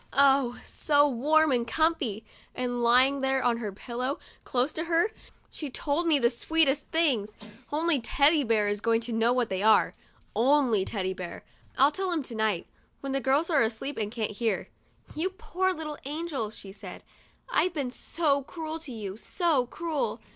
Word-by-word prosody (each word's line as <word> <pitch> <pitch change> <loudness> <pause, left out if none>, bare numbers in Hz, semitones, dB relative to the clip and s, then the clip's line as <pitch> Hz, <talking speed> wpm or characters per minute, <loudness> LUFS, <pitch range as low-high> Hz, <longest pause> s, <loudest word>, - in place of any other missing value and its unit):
Oh, 270 -3 +4
so 290 -1 +2
warm 300 +4 +3
and 240 -2 +1
comfy; 275 -9 0 0.3
and 245 -1 -2
lying 255 +4 +4
there 265 0 +1
on 240 -1 +2
her 215 -3 -4
pillow, 250 - -4 0.3
close 255 +3 0
to 320 - -3
her, 340 +6 +2 0.4
she 300 - -6
told 295 +6 -1
me 315 -3 +5
the 235 -3 +2
sweetest 290 +2 +1
things! 265 -11 +1 0.4
Only 310 -2 +1
Teddy 285 +6 +3
Bear 220 -3 +2
is 205 0 -1
going 230 0 +2
to 235 0 -4
know 225 +1 +2
what 245 -2 +1
they 190 0 -2
are; 215 +1 +4 0.4
only 245 -5 +3
Teddy 190 -3 -2
Bear. 180 -2 -8 0.3
I'll 275 +3 +5
tell 380 +3 -2
him 325 -4 -1
to 250 - -6
night, 220 -5 0 0.4
when 275 - -4
the 270 0 0
girls 280 +6 +1
are 300 -4 +4
asleep 230 +5 -2
and 210 -1 -2
can't 225 -3 -3
hear. 215 -1 -2 0.2
" - - -21
You 330 +5 0
poor 375 -2 -1
little 310 -4 -5
angel," 290 -6 -3
she 200 -2 -10
said; 195 -2 -10 0.3
" - - -32
I've 360 -7 +1
been 275 -5 -2
so 285 +1 0
cruel 320 +3 -6
to 305 -4 -8
you, 205 -4 -6
so 300 - 0
cruel. 325 +1 -3
270 Hz, 185 wpm, -28 LUFS, 230-310 Hz, 0.4 s, me